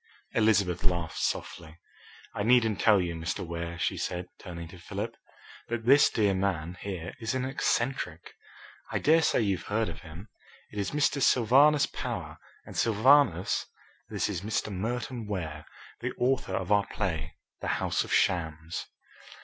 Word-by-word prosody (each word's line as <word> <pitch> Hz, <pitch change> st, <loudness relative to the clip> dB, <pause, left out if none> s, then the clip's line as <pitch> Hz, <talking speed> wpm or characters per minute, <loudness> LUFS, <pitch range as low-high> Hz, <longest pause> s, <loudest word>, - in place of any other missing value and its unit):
Elizabeth 100 Hz, -5 st, +2 dB
laughed 85 Hz, -3 st, -1 dB
softly. 80 Hz, -1 st, -3 dB, 0.6 s
"I -, -, -3 dB
needn't 115 Hz, -2 st, +3 dB
tell 105 Hz, -3 st, +6 dB
you, 85 Hz, -2 st, -1 dB
Mr. 80 Hz, +2 st, -3 dB
Ware," 85 Hz, 0 st, -5 dB
she -, -, -1 dB
said, 90 Hz, 0 st, -3 dB
turning 85 Hz, -2 st, -7 dB
to 90 Hz, -, -12 dB
Philip, 85 Hz, -, -5 dB, 0.5 s
"that 115 Hz, -1 st, -3 dB
this 140 Hz, +4 st, +7 dB
dear 105 Hz, -3 st, +2 dB
man 90 Hz, -3 st, -1 dB
here 90 Hz, -3 st, -5 dB
is 115 Hz, +1 st, -2 dB
an 130 Hz, 0 st, -1 dB
eccentric. 120 Hz, -9 st, -1 dB, 0.6 s
I -, -, 0 dB
dare 160 Hz, +2 st, +4 dB
say 145 Hz, -, +2 dB
you've 100 Hz, -5 st, -1 dB
heard 110 Hz, 0 st, +1 dB
of 80 Hz, -, -8 dB
him. 85 Hz, +7 st, -11 dB, 0.4 s
It 105 Hz, -, -5 dB
is 100 Hz, -, -1 dB
Mr. 145 Hz, -1 st, +1 dB
Sylvanus 135 Hz, +5 st, +5 dB
Power, -, -, -5 dB, 0.3 s
and -, -, -11 dB
Sylvanus, 115 Hz, -, +3 dB, 0.4 s
this -, -, -1 dB
is 95 Hz, -5 st, -3 dB
Mr. 110 Hz, 0 st, -2 dB
Merton 115 Hz, +3 st, -3 dB
Ware, 80 Hz, -7 st, -4 dB, 0.3 s
the -, -, -3 dB
author 125 Hz, -6 st, +1 dB
of 95 Hz, +1 st, -3 dB
our 100 Hz, -1 st, +4 dB
play 80 Hz, -6 st, -3 dB, 0.2 s
'The -, -, -5 dB
House -, -, 0 dB
of -, -, -9 dB
Shams.'" 80 Hz, -1 st, 0 dB
100 Hz, 155 wpm, -29 LUFS, 85-115 Hz, 0.6 s, this